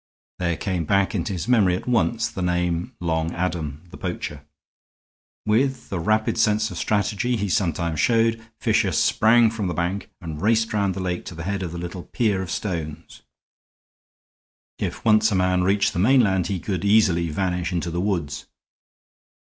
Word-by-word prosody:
There 85 -2 0
came 90 -5 -2
back 100 +4 +2
into 100 -2 -2
his 90 +1 -4
memory 105 -8 +4
at 90 - -6
once 115 -1 +1
the 95 - -6
name 90 +5 -1
Long 80 -1 -1
Adam, 80 -4 -3
the - - -10
poacher. 75 -1 -5 1.0
With 125 +4 0
a 90 - -1
rapid 110 +6 +1
sense 110 -1 +2
of 90 - -7
strategy 105 +4 0
he 105 -1 -1
sometimes 85 -4 0
showed, 115 -1 +2 0.2
Fisher 110 -5 +1
sprang 115 +7 +4
from 110 -4 -3
the 90 - -3
bank 90 +3 -2
and 80 -4 -7
raced 110 +2 +2
round 100 -3 +1
the 95 - -4
lake 90 -1 -2
to 85 - -8
the 80 - -6
head 100 +2 -2
of 90 -3 -4
the 85 - -6
little 85 +1 -6
pier 105 -6 0
of 95 - -5
stones. 80 -5 -5 1.6
If - - -4
once 110 0 +4
a - - +1
man 90 0 +2
reached 100 +2 +2
the - - -2
mainland 100 -5 +3
he 95 -1 -2
could 95 -1 -3
easily 100 -5 +3
vanish 90 +2 -1
into 85 -1 -2
the 85 +1 -2
woods. 90 -7 -2
95 Hz, 170 wpm, -23 LUFS, 85-110 Hz, 1.6 s, memory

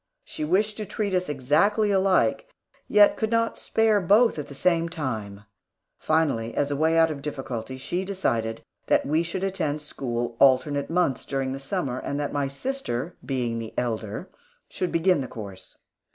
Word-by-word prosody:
She - - -6
wished 205 +7 +1
to 215 - -4
treat 205 -1 -2
us 180 -2 0
exactly 160 - +2
alike, 195 - +2 0.4
yet 210 0 +5
could 220 - 0
not 230 0 +1
spare 220 -2 +2
both 205 +2 +4
at 145 - -5
the 140 - -10
same 170 +1 +2
time. 110 - -4 0.6
Finally, 140 -8 0
as 145 0 0
a - - 0
way 160 +3 +2
out 165 -1 +5
of 150 - -4
the - - -11
difficulty, 130 -4 -5
she 175 +8 -3
decided 115 - -2 0.2
that - - +3
we 155 +3 +2
should 175 +3 -3
attend 155 -6 -1
school 120 -5 -4
alternate 140 +1 +3
months, 165 -5 +1
during 135 -1 -2
the 135 - -5
summer; 135 -4 -2
and 140 - -3
that 145 - -2
my 145 -1 0
sister, 165 - -4
being 120 -4 -2
the 110 -1 -7
elder, 110 - -3 0.4
should 180 - -3
begin 170 -1 +3
the 130 - -4
course. 100 -6 -9
150 Hz, 175 wpm, -25 LUFS, 130-185 Hz, 0.6 s, yet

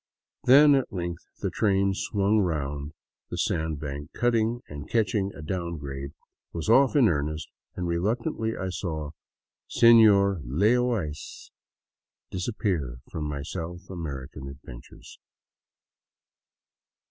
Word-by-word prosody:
Then 145 +3 +8
at 135 -2 +1
length 85 -2 -4 0.2
the - - -1
train 100 -2 +2
swung 100 +2 +1
round 75 -5 -2 0.4
the - - -5
sandbank 75 -2 -2
cutting 120 0 +1
and, 75 -1 -8
catching 105 -3 +1
a 80 - -9
down 85 0 -3
grade, 70 -1 -6 0.4
was 85 +4 -4
off 135 +5 +5
in 135 -6 +6
earnest, 75 -1 -1 0.3
and 90 - -3
reluctantly 110 - -1
I 95 - -3
saw 80 -5 -4 0.3
" - - -67
Senor 105 -6 +6
Lay 85 - +2
0 125 0 +2 0.2
Ice 75 0 -9 0.4
'* - - -62
disappear 90 - -2
from 75 - -4
my 70 -1 -4
South 85 +4 -6
American 70 -5 -6
adventures. 65 -3 -12
90 Hz, 125 wpm, -27 LUFS, 75-110 Hz, 0.4 s, Then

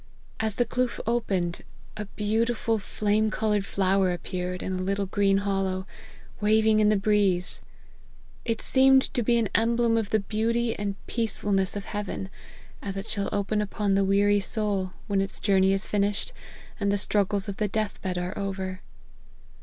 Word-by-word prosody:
As 220 -2 -1
the 245 - +2
kloof 250 -1 -1
opened, 195 -7 -1 0.3
a 210 0 -4
beautiful 225 +2 0
flame 210 +2 0
coloured 210 -2 0
flower 190 -1 +2
ap 175 -2 -3
peared 180 -1 -4
in 190 - -3
a 185 - -2
little 200 +2 -1
green 195 0 +2
hollow, 195 -2 -1 0.5
waving 215 +1 +4
in 210 -1 +4
the 215 - +4
breeze. 195 -3 +1 0.8
It 230 -1 -2
seemed 265 0 +5
to 250 - +1
be 235 +1 +3
an 225 -4 +1
emblem 230 0 +2
of 220 -3 -1
the 220 - +2
beauty 225 +3 0
and 200 -1 -3
peacefulness 205 -4 0
of 205 - -4
heaven, 205 -2 -4 0.5
as 195 -1 -5
it 195 +3 -5
shall 200 -2 -1
open 205 +1 0
upon 205 -1 -1
the 195 0 +3
weary 200 +1 +3
soul, 200 -2 -1
when 200 -2 +1
its 195 - -2
journey 190 -2 +3
is 195 0 0
finished, 205 - -1 0.5
and 200 -1 +1
the 205 - +2
struggles 200 0 +1
of 200 -1 -5
the 210 - 0
death 215 +1 -2
bed 185 -1 -2
are 180 +2 -3
over. 190 -2 -4
205 Hz, 170 wpm, -26 LUFS, 195-220 Hz, 0.8 s, seemed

